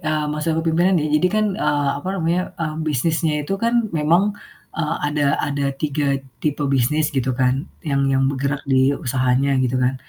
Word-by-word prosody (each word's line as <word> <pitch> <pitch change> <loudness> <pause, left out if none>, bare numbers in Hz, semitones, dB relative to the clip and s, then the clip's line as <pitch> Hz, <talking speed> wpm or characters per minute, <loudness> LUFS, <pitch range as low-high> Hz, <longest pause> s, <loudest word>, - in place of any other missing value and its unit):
eee, 155 -1 -1
masa 155 +1 -1
kepemimpinan 165 +3 +2
nih 155 - -1
jadi 180 - +3
kan, 215 0 +1
eee, 145 -8 0
apa 185 - -6
namanya, 170 0 +1 0.2
mmm, 155 -1 -3
bisnisnya 155 +1 0
itu 195 - -1
kan 235 0 +2
memang, 170 +7 +2 0.4
eee, 165 0 -1
ada 145 -1 0
ada 140 -1 -1
3 140 -2 0 0.2
tipe 150 -1 -1
bisnis 140 +3 +1
gitu 130 -1 0
kan, 130 +4 0 0.2
yang 140 -2 +1
yang 135 0 +2
bergerak 140 +1 -2
di 130 0 +3
usahanya 130 +2 +1
gitu 130 0 0
kan. 125 +1 +1
150 Hz, 175 wpm, -21 LUFS, 135-165 Hz, 0.4 s, jadi